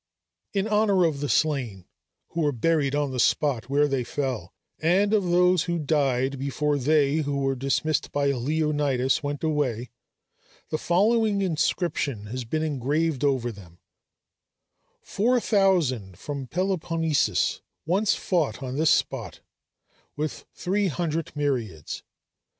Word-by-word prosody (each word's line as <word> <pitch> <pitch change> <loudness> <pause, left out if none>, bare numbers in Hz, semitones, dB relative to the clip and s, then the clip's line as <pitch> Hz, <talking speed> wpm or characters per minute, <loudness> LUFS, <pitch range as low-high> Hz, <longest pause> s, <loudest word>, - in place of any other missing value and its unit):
In 200 +1 0
honor 210 -4 +3
of 155 -4 0
the 145 0 -2
slain, 125 - 0 0.4
who 170 - -3
were 150 -2 +2
buried 145 +2 +1
on 145 -2 0
the 130 - -3
spot 125 -2 +1
where 145 +1 +3
they 135 -3 -1
fell, 125 -10 -3 0.3
and 190 +6 +2
of 205 -3 +3
those 180 0 +3
who 170 -1 -1
died 135 -3 0
before 145 +1 0
they 145 +1 +3
who 145 -2 -1
were 135 -1 +1
dismissed 135 +4 -1
by 140 -1 +1
Leonidas 145 0 0
went 145 0 -4
away, 135 -7 -1 0.8
the 155 - -2
following 205 +2 +2
inscription 155 - -1
has 125 -1 -4
been 155 +7 -1
engraved 150 0 0
over 130 -4 +1
them: 90 -5 -14 1.3
"Four 245 +5 +1
thousand 165 - +1
from 140 -3 -5
Peloponnesus 165 -2 0 0.2
once 195 +6 +2
fought 155 - -1
on 130 +1 -4
this 160 0 +3
spot - - 0 0.7
with 150 +1 -4
three 200 +2 0
hundred 165 0 -2
myriads! 120 - -2
150 Hz, 130 wpm, -25 LUFS, 135-170 Hz, 1.3 s, honor